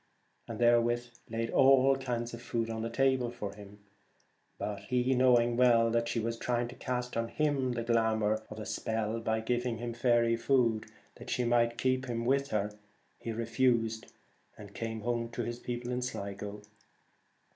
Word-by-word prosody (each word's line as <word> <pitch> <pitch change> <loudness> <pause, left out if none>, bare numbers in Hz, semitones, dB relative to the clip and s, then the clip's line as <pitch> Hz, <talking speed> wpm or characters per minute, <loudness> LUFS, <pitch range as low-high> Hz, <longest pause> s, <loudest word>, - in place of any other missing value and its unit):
and - - -6
therewith 120 0 +3 0.2
laid 115 0 -2
all 135 0 +5
kinds 120 -3 -3
of 115 - -7
food 115 -2 -2
on 110 0 -3
the 115 - -2
table; 130 0 +1 1.3
but 105 -1 -4
he, 125 +2 +1
knowing 120 -2 +4
well 115 -2 +4
that 115 0 +1
she 115 - -1
was 115 +1 -3
trying 120 -1 0
to 120 - -9
cast 125 -1 -3
on 115 0 0
him 140 -3 0
the 120 -1 -2
glamour 110 -2 +1 0.8
by 110 0 0
giving 120 +1 -1
him 120 +1 -4
faery 120 -1 +3
food, 115 -3 +1 0.3
that - - -10
she 125 - 0
might 120 0 +2
keep 130 +1 0
him 115 -1 -2
with 140 +2 +2
her, 105 -3 -1 0.5
refused 115 0 0 0.5
and 100 -1 -11
came 110 0 -4
home 120 0 -1
to 120 - -4
his 120 0 -4
people 120 0 -4
in 125 0 -1
Sligo. 100 -3 -5
120 Hz, 155 wpm, -31 LUFS, 115-125 Hz, 1.3 s, all